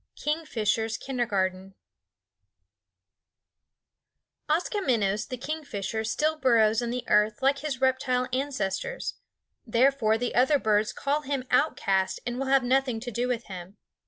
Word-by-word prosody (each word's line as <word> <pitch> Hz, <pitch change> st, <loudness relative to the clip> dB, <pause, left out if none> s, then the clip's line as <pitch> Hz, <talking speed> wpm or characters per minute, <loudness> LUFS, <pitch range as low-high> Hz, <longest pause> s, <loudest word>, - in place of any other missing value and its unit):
KINGFISHER'S 225 Hz, -8 st, -1 dB
KINDERGARTEN 195 Hz, -7 st, -2 dB, 2.7 s
Koskomenos 255 Hz, -, 0 dB
the 255 Hz, -, -5 dB
kingfisher 235 Hz, -7 st, -4 dB
still 305 Hz, +8 st, 0 dB
burrows 225 Hz, -4 st, +4 dB
in 240 Hz, -, -2 dB
the 250 Hz, +1 st, -3 dB
earth 210 Hz, +3 st, +2 dB
like 275 Hz, +1 st, +3 dB
his 275 Hz, -3 st, -4 dB
reptile 260 Hz, -1 st, +1 dB
ancestors; 275 Hz, -, -2 dB, 0.5 s
therefore 235 Hz, -2 st, +2 dB
the 245 Hz, +1 st, -2 dB
other 260 Hz, +4 st, +4 dB
birds 215 Hz, -4 st, +1 dB
call 285 Hz, +2 st, -1 dB
him 275 Hz, -3 st, -3 dB
outcast 195 Hz, -9 st, +1 dB
and 245 Hz, +1 st, -3 dB
will 270 Hz, -, -2 dB
have 270 Hz, -1 st, +4 dB
nothing 255 Hz, -2 st, +1 dB
to 245 Hz, +2 st, -6 dB
do 240 Hz, +3 st, -1 dB
with 240 Hz, -2 st, -1 dB
him. 185 Hz, +1 st, -9 dB
250 Hz, 125 wpm, -27 LUFS, 215-275 Hz, 2.7 s, burrows